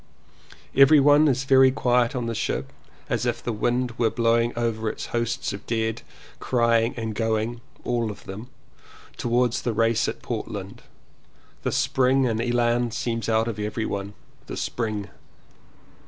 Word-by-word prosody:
"Everyone 145 +2 +6
is 135 -1 +1
very 135 -1 +6
quiet 125 -2 +1
on 125 -2 -2
the 115 - -2
ship, - - -3 0.3
as 125 - -1
if 120 0 -2
the 120 - -2
wind 120 +3 0
were 115 -2 +3
blowing 115 +1 +2
over 115 -2 -1
its - - -6
hosts 120 +1 -1
of 100 - -7
dead, 110 -1 -1 0.4
crying 115 -1 +2
and 110 -1 -3
going 115 +2 -1 0.2
(all 120 -2 -1
of 105 - -9
them) 105 +6 -8 0.7
towards 120 0 +1
the 120 - -1
race 115 +1 +2
at - - -5
Portland. - - -5 0.8
The - - -1
spring 130 +1 +2
and 115 -1 -1
elan 120 0 +1
seems 115 0 -3
out 110 0 +2
of 110 -2 -4
everyone. 105 -1 -3 0.2
— - - -31
the - - -6
Spring! 105 -4 -3
115 Hz, 150 wpm, -24 LUFS, 110-125 Hz, 0.8 s, Everyone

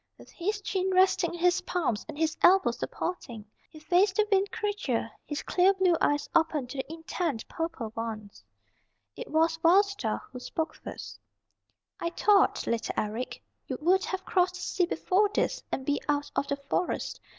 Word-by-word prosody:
With - - -15
his 410 +4 -2
chin 380 -1 -1
resting 370 -2 +3
in - - -8
his 355 +1 +3
palms 280 - -1
and - - -7
his 320 0 0
elbows 380 +2 +5
supporting, 240 - -4 0.2
he - - -14
faced 365 +5 +3
the 430 +1 +2
Wind 390 0 +3
Creature, 400 - -2 0.2
his 295 0 -4
clear 375 +2 +3
blue 370 -2 +3
eyes 290 0 +2
open 315 -4 +2
to 275 - -7
the 265 - -4
intent 325 -5 -3
purple 325 -10 -4
ones. 220 -3 -6 0.7
It 485 - -7
was 325 +1 +2
Wild 365 +5 +6
Star 400 +1 -3
who 250 - -7
spoke 320 +5 -3
first. - - -9 0.8
"I 340 - -1
thought, 400 +3 +3
little 230 -1 -2
Eric, 220 +4 -3 0.2
you - - -3
would 370 +4 +3
have 380 0 -4
crossed 360 -1 +2
the - - -7
sea 365 -3 +1
before 380 +5 +2
this, - - 0
and 265 - -3
be 290 0 0
out 290 0 0
of 280 - 0
the 280 - 0
Forest. 360 - -1
340 Hz, 175 wpm, -28 LUFS, 290-380 Hz, 0.8 s, Wild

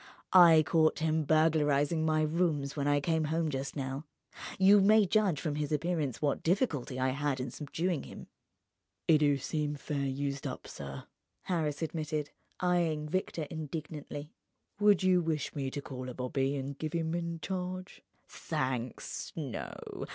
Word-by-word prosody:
I 170 -4 +8
caught 155 +1 +3
him 160 -1 +1
burglarizing 155 0 +3
my 155 -1 +2
rooms 155 -3 0
when 145 -1 -1
I 145 0 +3
came 160 +1 +1
home 160 +1 0
just 135 0 -4
now. 135 +1 -4 0.5
You 195 +1 +7
may 210 +2 +6
judge 190 -5 +2
from 150 -2 -2
his 150 -1 -2
appearance 150 -4 -1
what 145 -2 +1
difficulty 160 - 0
I 130 0 +2
had 140 0 -1
in 130 -1 -3
subduing 160 +3 -2
him." - - -10 0.8
"'E 155 -2 +6
do 145 -2 +3
seem 150 +2 -2
fair 140 -1 -2
used 140 +1 -2
up, - - -6
sir," 70 -1 -7 0.4
Harris 160 -4 -1
admitted, 155 -2 -3 0.3
eyeing 170 -4 +1
Victor 180 -2 -1
indignantly. 155 -1 -6 0.5
"Would 205 -3 +5
you 185 -1 +4
wish 160 -3 -2
me 135 -2 -2
to 140 +1 -5
call 130 -1 -6
a 125 - -7
bobby 135 +2 -1
and 140 0 -5
give 155 +1 -3
'im 165 -1 -1
in 170 -1 -3
charge?" 185 0 -5 0.3
"Thanks, 130 -1 -3
no. 140 -8 -6
155 Hz, 155 wpm, -31 LUFS, 140-165 Hz, 0.8 s, I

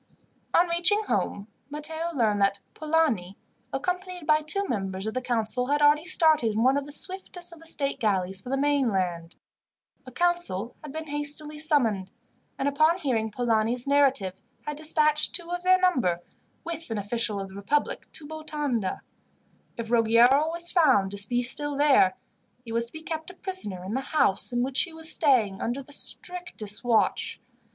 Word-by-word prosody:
On 345 +1 +5
reaching 345 +5 +2
home 205 - -2 0.2
Matteo 315 +3 -2
learned 215 -5 +1
that 200 0 +2
Polani, 300 - 0 0.3
accompanied 360 +3 -4
by 305 0 +3
two 390 +7 +1
members 195 - -3
of 220 - -3
the 255 - -2
council, 245 0 0
had 290 +2 +1
already 295 +2 +4
started 315 -10 +3
in 220 +2 0
one 260 +2 +4
of 285 -1 -1
the 290 - -9
swiftest 355 +1 -2
of 335 - -13
the 330 - -7
state 280 -3 0
galleys 195 -3 0
for 245 - -9
the 270 - 0
mainland. 195 -13 0 0.7
A - - -9
council 345 - 0
had 300 - -8
been 315 +2 -6
hastily 295 +1 -2
summoned, 235 - +1 0.5
and, 275 - -1
upon 310 +4 +3
hearing 245 -10 -1
Polani's 230 +1 +1
narrative, 275 -9 +2 0.3
had 295 - -4
dispatched 305 -1 +2
two 345 -1 +1
of 355 0 -3
their 370 +1 +4
number, 250 - +1 0.4
with 330 -2 -6
an 225 - -3
official 210 0 -2
of 195 0 -6
the 190 - -13
republic, 270 +9 -2
to 310 - -4
Botonda. 295 -9 -3 0.8
If 230 -1 -6
Ruggiero 240 +6 +4
was 340 +1 -1
found 260 - +3
to 200 0 +1
be 245 0 +1
still 290 +3 +2
there, 275 -10 +4 0.5
he 230 - -8
was 230 +1 -1
to - - -14
be 315 - -9
kept 320 0 -5
a 365 - -12
prisoner 360 - -3
in 190 +3 -5
the 265 - -1
house 265 -9 +1
in 245 0 0
which 260 +1 0
he 340 - -3
was 320 -1 +1
staying, 230 -10 +2
under 245 +4 -3
the 285 - -8
strictest 295 - -3
watch. 455 - +1
275 Hz, 175 wpm, -26 LUFS, 220-315 Hz, 0.8 s, On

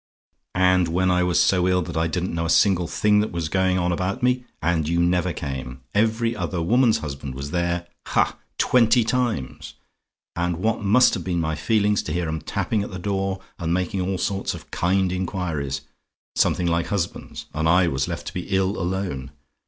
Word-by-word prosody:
And 90 -1 +4
when 90 +3 +1
I 90 0 +3
was 90 -1 +2
so 90 -1 +3
ill, 90 -1 +2
that - - -7
I 80 0 +1
didn't 90 +2 -2
know 85 0 -1
a - - -4
single 90 -1 +3
thing 105 +3 +2
that 105 - 0
was 85 -3 -3
going 95 +1 +2
on 90 0 +1
about 95 +8 -2
me, 125 0 +2
and 80 -1 0
you 85 0 +1
never 90 +1 +2
came. 65 -5 -6
Every 115 +2 +1
other 90 - -3
woman's 115 +7 +3
husband 70 -3 -6
was 70 +2 -6
there 85 0 -1 0.2
ha! - - +2 0.2
twenty 120 -1 +4
times. 115 - -2 0.6
And 85 -1 -1
what 110 +5 0
must 110 +5 +5
have 95 - -2
been 90 -1 -1
my 80 -1 -1
feelings 105 +6 +1
to 75 - -5
hear 85 0 -1
'em 80 0 -3
tapping 110 - -1
at 100 - -4
the 95 - -6
door, 95 0 -2 0.2
and 85 0 0
making 90 +1 -1
all 95 +1 -1
sorts 95 +1 -2
of - - -12
kind 95 +1 +1
inquiries 85 -7 -2 0.5
something 90 - +2
like 85 0 +1
husbands 95 -4 -4
and 80 +1 0
I 90 +1 +5
was 65 -4 -1
left - - -5
to - - -6
be 90 - -5
ill 95 +1 +1
alone? 90 -7 -3
90 Hz, 195 wpm, -23 LUFS, 85-100 Hz, 0.6 s, must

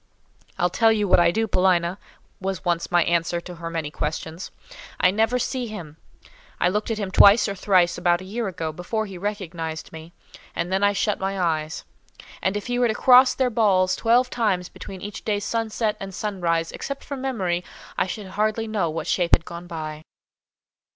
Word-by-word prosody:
"I'll 175 0 +1
tell 225 +3 +4
you 210 -2 +1
what 180 - +5
I 170 0 +5
do, 225 +6 +1
Paulina," 180 -1 +2 0.4
was 190 -1 -4
once 170 -1 0
my 175 -1 +4
answer 170 0 0
to 180 0 -9
her 165 0 -5
many 160 -3 -3
questions. 160 +4 -4 0.5
"I 180 - +5
never 225 +4 +2
see 250 0 -2
him. 170 -9 -8 0.6
I 175 - +3
looked 210 +4 -1
at 225 - -1
him 200 -3 -3
twice 200 +4 +7
or 200 - -2
thrice 180 -3 +2
about 175 -1 +2
a - - -9
year 220 +3 -3
ago, 165 -4 -4
before 200 +7 -3
he 190 -3 -9
recognised 175 -7 -5
me, 160 +1 -10 0.4
and 175 +2 -2
then 195 +1 +1
I 205 0 +4
shut 205 +1 0
my 195 0 -2
eyes; 160 -2 -1 0.6
and 190 +2 0
if 205 - -6
he 245 0 -1
were 245 - +4
to 220 - -1
cross 255 +2 +6
their 255 -2 +1
balls 190 -5 +3
twelve 240 +2 +3
times 190 -7 0
between 190 -2 -10
each 205 +1 -7
day's 205 -2 -1
sunset 220 -1 -1
and 195 -1 -7
sunrise, 170 -5 -1
except 275 0 -6
from 280 -2 -6
memory, 190 -10 -1 0.3
I - - 0
should 205 +2 -5
hardly 215 +3 -1
know 210 -6 0
what 160 +1 -4
shape 175 -2 +3
had 165 - -8
gone 170 +1 -8
by." 155 -2 -6
190 Hz, 195 wpm, -24 LUFS, 170-215 Hz, 0.6 s, twice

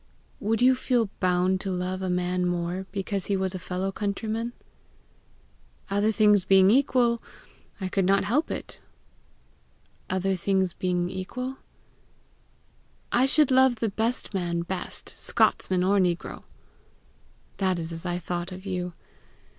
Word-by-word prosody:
"Would 225 +3 0
you 260 +1 +7
feel 245 -4 0
bound 185 +1 +2
to 195 - -3
love 185 0 -2
a 185 - -2
man 180 0 0
more 175 +2 -2
because 195 -1 -2
he 200 - +1
was 190 0 -1
a 185 - -4
fellow 185 +3 -3
countryman?" 220 +3 -3 1.4
"Other 205 +2 +2
things 210 -3 +4
being 190 +1 +6
equal, 245 -2 +3 0.6
I 190 - -2
could 190 0 0
not 195 +1 +3
help 285 +9 +1
it." - - -6 1.3
"Other 190 +1 0
things 190 0 +1
not - - -36
being 180 -1 0
equal, 250 +8 -5 0.8
?" - - -37 0.7
"I 250 +2 +4
should 295 0 +4
love 260 -1 +5
the 225 -1 -1
best 225 +3 -2
man 170 -3 -1
best 185 +1 -6
Scotsman 185 -1 +2
or 200 +2 +3
negro." 175 -2 -1 1.1
"That 190 -2 +1
is 165 0 -5
as 165 0 -6
I 175 -1 -2
thought 175 +1 -4
of 185 +1 -9
you. 180 -2 -3
190 Hz, 145 wpm, -26 LUFS, 180-220 Hz, 1.4 s, you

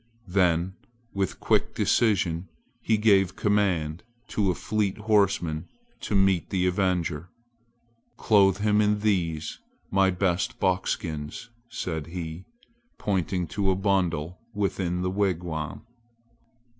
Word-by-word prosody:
Then 90 -1 +2 0.4
with 100 -2 -2
quick - - +1
decision 95 -6 +2 0.3
he 110 -1 +2
gave 100 -3 +3
command 90 -7 +1 0.3
to 100 -3 +1
a 90 - +1
fleet 105 0 -1
horseman 95 -7 +1 0.3
to 105 - -3
meet 95 -2 +3
the 90 -2 0
avenger. 90 -3 0 0.9
"Clothe 100 -4 +4
him 105 0 +3
in 105 0 +2
these 85 -7 -1 0.3
my 95 -1 +4
best 95 +6 0
buckskins," 90 0 -2 0.2
said 80 -9 -4
he, 85 0 -6 0.5
pointing 95 -2 -1
to 100 +4 0
a 95 - +3
bundle 90 -4 0 0.2
within 90 -3 -1
the 90 - 0
wigwam. 85 -6 -2
95 Hz, 110 wpm, -26 LUFS, 85-100 Hz, 0.9 s, Clothe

